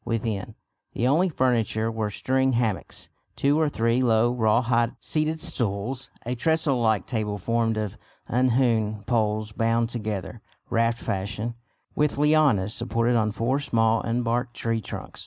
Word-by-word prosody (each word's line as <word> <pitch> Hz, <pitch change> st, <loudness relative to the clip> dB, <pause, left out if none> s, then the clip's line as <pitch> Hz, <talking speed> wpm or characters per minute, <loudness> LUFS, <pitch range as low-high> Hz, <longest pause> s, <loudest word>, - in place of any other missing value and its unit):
Within, 110 Hz, -2 st, -3 dB, 0.4 s
the 120 Hz, -, -1 dB
only 165 Hz, +8 st, +3 dB
furniture 115 Hz, -, +1 dB
were 110 Hz, -2 st, -2 dB
string 130 Hz, +5 st, +1 dB
hammocks, 110 Hz, -6 st, -2 dB, 0.3 s
two 145 Hz, +2 st, +2 dB
or 155 Hz, -2 st, +2 dB
three 115 Hz, -1 st, +1 dB
low 120 Hz, -1 st, +3 dB
raw 115 Hz, 0 st, +2 dB
hide 120 Hz, -1 st, +1 dB
seated 155 Hz, +1 st, 0 dB
stools, 120 Hz, +2 st, -2 dB, 0.2 s
a 120 Hz, -, -1 dB
trestle 155 Hz, 0 st, +1 dB
like 110 Hz, -5 st, +2 dB
table 105 Hz, -3 st, -2 dB
formed 115 Hz, +2 st, 0 dB
of 105 Hz, -2 st, -3 dB, 0.3 s
unhewn 115 Hz, -4 st, +1 dB
poles 110 Hz, -2 st, 0 dB
bound 115 Hz, +1 st, +1 dB
together, 105 Hz, -2 st, -4 dB, 0.3 s
raft 115 Hz, 0 st, +2 dB
fashion, 105 Hz, +3 st, -3 dB, 0.4 s
with 150 Hz, -2 st, 0 dB
lianas, 145 Hz, -10 st, +3 dB
supported 115 Hz, +3 st, 0 dB
on 110 Hz, -2 st, +2 dB
four 115 Hz, +6 st, 0 dB
small 115 Hz, -5 st, +2 dB
unbarked 120 Hz, +1 st, -1 dB
tree 115 Hz, -1 st, -1 dB
trunks. -, -, -7 dB
115 Hz, 140 wpm, -25 LUFS, 110-125 Hz, 0.4 s, only